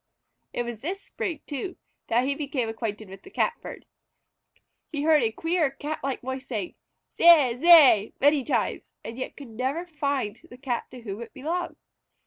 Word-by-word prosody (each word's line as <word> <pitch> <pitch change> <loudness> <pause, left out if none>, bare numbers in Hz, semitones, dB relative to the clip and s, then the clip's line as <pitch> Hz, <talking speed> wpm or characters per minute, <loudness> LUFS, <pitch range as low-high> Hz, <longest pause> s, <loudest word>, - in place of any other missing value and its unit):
It 240 - -2
was 240 -2 -6
this 360 - -4
spring, 395 -5 -5
too, 295 +6 -5 0.3
that 240 +2 +2
he 280 - +1
became 280 -4 -2
acquainted 220 -2 -4
with 195 +1 -11
the - - -14
Catbird. 470 +4 -3 1.1
He 290 -2 -2
heard 310 -2 +5
a 225 -2 +1
queer 325 +4 0
Cat 295 +3 -5
like 275 -1 -2
voice 260 +1 -5
saying 210 -7 -4 0.5
"Zeay! 305 -8 +7
Zeay!" 285 - +7
many 290 0 +4
times, 290 - -1
and 230 - -7
yet 260 - -6
could 280 -4 -10
never 260 +9 -2
find 280 -9 -2
the 245 - -12
Cat 255 -3 -3
to 250 -1 -11
whom 210 -1 -6
it 235 - -10
belonged. 335 +6 -3
270 Hz, 170 wpm, -26 LUFS, 235-310 Hz, 1.1 s, Zeay